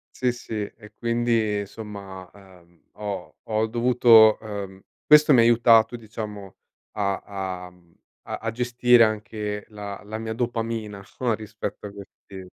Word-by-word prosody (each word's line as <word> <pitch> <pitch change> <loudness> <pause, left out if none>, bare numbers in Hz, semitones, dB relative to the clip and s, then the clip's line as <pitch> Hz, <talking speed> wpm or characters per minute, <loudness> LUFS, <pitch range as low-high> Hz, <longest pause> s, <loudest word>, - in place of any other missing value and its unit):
Sì, 125 -1 +1
sì. 120 -1 -9
E 105 0 -6
quindi 115 -3 0
insomma, 100 -3 -9
uhm, 90 -4 -20
ho 100 -6 -6
ho 110 0 -1
dovuto 115 -1 +5
ehm, 100 -3 -7 0.3
questo 150 -1 +7
mi 125 - +6
ha - - +7
aiutato 115 0 +5
a - - -5
diciamo 105 -3 -8 0.4
a 95 -2 -4
a, 90 - -12
mhmm, 85 -2 -25 0.3
a - - -4
a 115 0 -4
gestire 120 0 +4
anche 105 -1 -4
la 105 -2 -8
la 110 +1 -6
mia 110 0 -4
dopamina 115 -3 -3
o 120 -3 0
rispetto 105 -1 -6
a - - -10
questi 100 -1 -12
110 Hz, 150 wpm, -24 LUFS, 100-115 Hz, 0.4 s, questo